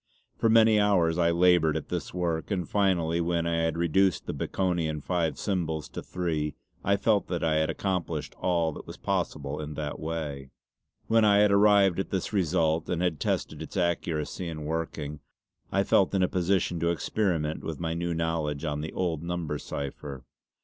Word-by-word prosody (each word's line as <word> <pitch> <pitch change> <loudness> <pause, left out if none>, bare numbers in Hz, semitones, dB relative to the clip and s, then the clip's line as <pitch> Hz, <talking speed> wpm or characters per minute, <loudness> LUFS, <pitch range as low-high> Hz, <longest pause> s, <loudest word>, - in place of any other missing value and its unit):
For 115 - +2
many 110 -1 +6
hours 90 -5 +3
I 85 -1 +4
laboured 85 -2 +4
at - - -7
this - - -3
work, 85 -3 -2
and 90 -5 -1
finally 85 -5 +1
when 85 0 0
I 85 0 0
had 80 0 0
reduced 85 +2 +2
the - - -3
Baconian 85 -5 -1
five 85 +1 -1
symbols 80 -6 -2
to - - -6
three 80 -4 -2 0.3
I 100 +1 +2
felt 105 0 +2
that 85 -2 -2
I 80 -1 +2
had 80 0 +1
accomplished 95 -3 -2
all 85 -3 +1
that - - -10
was - - -8
possible 75 +1 -2
in 75 0 -6
that 75 -1 -4
way. 80 +1 -3
See 75 -3 -3
Appendix 65 -1 -13
B. - - -50
When 115 -1 +6
I 100 -1 +5
had 105 0 +5
arrived 100 -2 +5
at 95 - -2
this 95 +2 -2
result, 80 -4 +1
and 90 - 0
had 85 -5 0
tested - - -2
its - - -7
accuracy 85 -1 -1
in 75 -2 -5
working, 75 -2 -3 0.5
I 100 - +2
felt 100 0 +3
in 95 - +3
a - - +4
position 90 -1 0
to 85 +1 +1
experiment 85 -3 -1
with 80 -3 -5
my 80 -1 -2
new 85 0 -2
knowledge 80 -2 -1
on 75 -1 -2
the 80 - -5
old 85 -5 -1
number 85 -4 -3
cipher. 70 -1 -6
85 Hz, 190 wpm, -28 LUFS, 80-95 Hz, 0.5 s, many